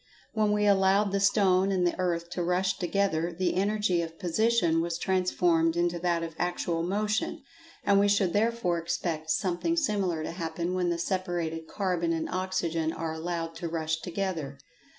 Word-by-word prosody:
When 215 -2 +2
we 210 0 +2
allowed 195 0 +4
the 200 - +1
stone 195 -1 +3
and 185 -2 +1
the 175 - +2
earth 170 -1 -1
to 180 - -3
rush 180 +2 0
together, 175 -2 0
the 180 +2 -1
energy 200 -2 +1
of 165 -1 -6
position 175 -2 +2
was 170 0 -2
transformed 175 -3 +2
into 175 0 +1
that 170 -1 0
of 165 -1 -5
actual 175 -1 -1
motion, 210 +8 -1 0.4
and 200 -1 +4
we 200 - +4
should 200 -3 +2
therefore 210 -5 +1
expect 165 -1 -3
something 190 - 0
similar 195 - 0
to - - -4
happen 170 +1 -3
when 180 -1 0
the 170 - 0
separated 170 -3 -2
carbon 180 -4 -1
and 160 -1 -2
oxygen 175 -4 -1
are 165 -1 -4
allowed 165 0 -3
to 170 - -4
rush 160 -1 -1
together. 165 -5 -4
175 Hz, 170 wpm, -28 LUFS, 165-195 Hz, 0.4 s, allowed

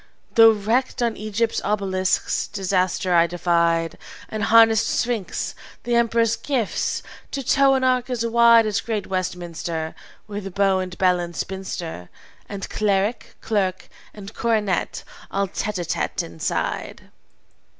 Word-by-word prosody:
"Though, 225 -1 +8
wrecked 235 +5 0
on 235 -2 0
Egypt's 215 +2 -1
obelisks, 190 -2 0
disaster 185 -1 0
I 170 0 +5
defied, 170 -1 +1 0.3
And 215 -1 -2
harnessed 225 -1 +5
Sphinx, 230 -6 -2 0.3
the 240 - -2
emperor's 230 -1 +2
gift, 255 -7 -2 0.3
to 275 - -4
tow 275 +1 +4
an 260 - 0
ark 255 -1 +2
as 240 -2 -1
wide 230 0 +6
As 210 -2 0
great 215 -4 -3
Westminster; 170 -3 -3 0.3
With 200 -3 -6
beau 195 -1 +3
and 185 -1 -5
bell 180 -1 +3
and 175 -1 -5
spinster, 180 - -5 0.4
And 200 -1 -5
cleric, 205 +2 -1
clerk, 195 -4 -1 0.2
and 200 -1 -10
coronet 215 -5 -1 0.3
all 195 0 -1
tête 210 +2 -3
à 175 - -3
tête - - -2
inside. 85 -1 -4
200 Hz, 130 wpm, -22 LUFS, 185-230 Hz, 0.4 s, Though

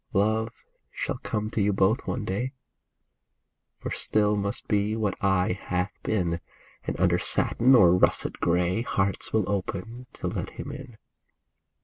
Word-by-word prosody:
Love 110 +2 +2 0.4
shall - - -4
come 105 0 -2
to 110 - 0
you 100 +1 +3
both 95 +5 +2
one 115 -4 -2
day. 120 +8 -2 1.2
For - - -6
still 105 -1 +2
must 100 0 -3
be 105 +1 +1
what 105 -4 0
aye 95 0 +3
hath 90 +2 -1
been; 85 -5 -1 0.4
And - - -3
under - - +3
satin 130 +3 +3
or 90 -6 +7
russet 90 - +2
gray 90 +4 +1
Hearts 100 -4 -1
will 110 -4 +1
open 105 +5 -4
to - - -8
let - - -3
him 140 - -5
in. 135 -5 -9
105 Hz, 145 wpm, -27 LUFS, 95-110 Hz, 1.2 s, or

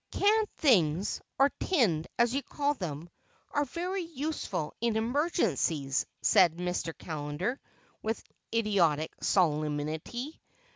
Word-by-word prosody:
"Canned 430 +1 +3
things—or 205 - +2
tinned, 205 - +2
as 235 0 +3
you 275 - +1
call 290 +1 -1
them—are 175 - -5
very 360 +7 -3
useful 305 - -3
in 235 -2 +1
emergencies," 220 - +1 0.2
said 170 -3 +5
Mr. 180 -1 -2
Callender 155 - -3 0.4
with 220 +1 -2 0.3
idiotic 185 -9 +2
solemnity. 155 - 0
210 Hz, 95 wpm, -30 LUFS, -, 0.4 s, said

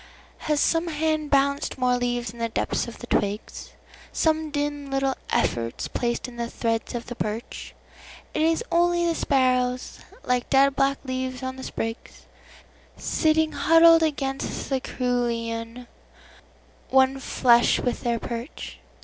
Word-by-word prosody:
Has 300 -1 +2
some 330 +3 +2
hand 310 -1 -1
balanced 280 0 +1
more 250 -1 +2
leaves 245 -2 -1
in 235 - -14
the 230 0 -1
depths 225 - -1
of 235 - -9
the - - -9
twigs? 205 -2 -2 0.4
Some 315 -1 +1
dim 290 -1 -3
little 270 0 +1 0.2
efforts 115 0 -1
placed 240 +1 -2
in 245 -1 -11
the 235 0 -3
threads 230 0 -2
of 235 - -4
the 245 - -6
birch?—It 230 +6 -7
is 325 +6 +2
only 345 0 +3
the 335 - +2
sparrows, 255 -4 +1 0.2
like 250 -1 0
dead 275 0 +4
black 275 0 +2
leaves 255 -1 -3
on 260 0 -3
the 260 - -9
sprigs, 225 -1 -6 0.7
Sitting 315 0 +1
huddled 330 0 +6
against 275 -4 -2
the 265 - +2
cerulean, 235 -1 -2 1.0
one 265 0 +4
flesh 240 -2 +3
with 245 - -2
their 235 -1 0
perch. 235 +4 -7
260 Hz, 140 wpm, -25 LUFS, 240-295 Hz, 1.0 s, huddled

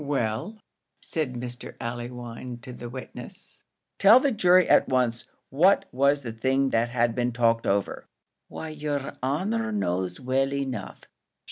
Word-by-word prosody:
"Well," 140 - -2 0.5
said 155 -6 -2
Mr. 120 0 -7
Allewinde 120 0 -6
to 125 - -8
the 120 0 -8
witness, 130 +1 -8 0.3
"tell 220 +5 +8
the 280 +1 +1
jury 185 -5 +5
at - - +5
once 125 -2 +1 0.3
what 180 +8 +4
was 140 +2 +2
the 115 -3 -5
thing 135 +3 +1
that 115 +1 +1
had 120 -1 +1
been 125 +1 0
talked 115 -1 +2
over." 100 0 -1 0.4
"Why, 160 - -7
yer 145 -2 -4
honour 205 - -1
knows 90 - -1
well 135 +1 0
enough. 130 -7 -4
130 Hz, 140 wpm, -26 LUFS, 120-145 Hz, 0.5 s, tell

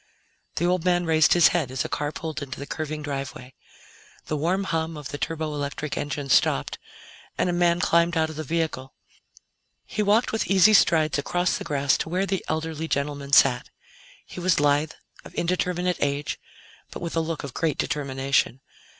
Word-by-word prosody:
The 170 - 0
old 180 -1 +1
man 175 -1 +2
raised 160 -2 +4
his 175 -1 +6
head 165 -7 0
as 130 - -2
a - - -1
car 145 0 -2
pulled 160 -1 -5
into 130 -2 -6
the 140 - -5
curving 155 0 -5
driveway. 135 -2 -6 0.7
The 155 - -2
warm 175 +6 0
hum 165 -3 -2
of 150 -2 -7
the 145 - -6
turboelectric 150 -1 -3
engine 145 -1 -3
stopped, - - +2 0.6
and - - +1
a - - -2
man 175 0 +2
climbed 170 -1 +2
out 160 0 +1
of - - -10
the 155 - -4
vehicle. 155 -4 -3 0.9
He 215 - -3
walked 210 +3 +3
with 220 - -1
easy 195 +2 +5
strides 155 -6 +4
across 175 +5 0
the - - -5
grass 140 -1 +1
to - - -3
where 185 +3 0
the 195 -2 -2
elderly 160 0 -3
gentleman 140 -1 -2
sat. - - +5 0.6
He - - -9
was 180 -3 +2
lithe, 145 +1 +2 0.3
of - - -13
indeterminate 180 0 0
age, 145 0 -1 0.5
but - - -8
with 170 - -4
a - - +2
look 160 -1 -3
of 140 -2 -7
great 155 -4 -1
determination. 135 -2 0
160 Hz, 180 wpm, -25 LUFS, 145-175 Hz, 0.9 s, his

